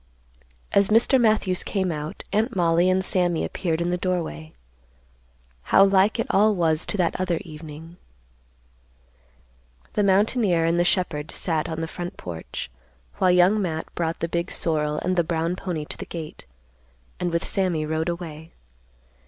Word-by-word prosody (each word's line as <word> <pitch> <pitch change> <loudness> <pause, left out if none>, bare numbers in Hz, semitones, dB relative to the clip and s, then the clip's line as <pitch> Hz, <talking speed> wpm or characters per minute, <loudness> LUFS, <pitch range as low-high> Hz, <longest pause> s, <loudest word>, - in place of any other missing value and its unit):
As 200 -1 +4
Mr. 235 +5 +4
Matthews 215 -5 +2
came 190 -3 -1
out, 150 0 -5
Aunt 220 +3 +1
Mollie 170 0 +3
and 185 0 +1
Sammy 175 -3 +1
appeared 170 -3 -2
in 175 +1 0
the 180 - 0
doorway. 165 - -3 1.2
How 195 - +7
like 195 +3 +3
it 230 - 0
all 210 +2 +4
was 160 -2 +1
to - - -2
that 175 -3 +1
other 180 -2 0
evening. 160 +1 -10 2.0
The - - +1
mountaineer 200 -3 +3
and 170 +1 +2
the - - +4
shepherd 170 -4 0
sat 160 -3 -2
on 160 0 -4
the 165 - -2
front 175 +1 -6
porch, 85 -7 -7 0.5
while 185 - +3
Young 180 +4 +4
Matt 160 -4 -4
brought 165 -1 -2
the 165 - 0
big 170 +1 -2
sorrel 150 -2 0
and 185 +1 0
the 175 - +3
brown 165 +1 -1
pony 175 -5 -4
to - - -4
the - - -7
gate, 155 - -8 0.7
and 175 - -1
with 170 0 -1
Sammy 180 -5 0
rode 160 +2 -1
away. 165 -2 -7
175 Hz, 160 wpm, -24 LUFS, 160-185 Hz, 2.0 s, How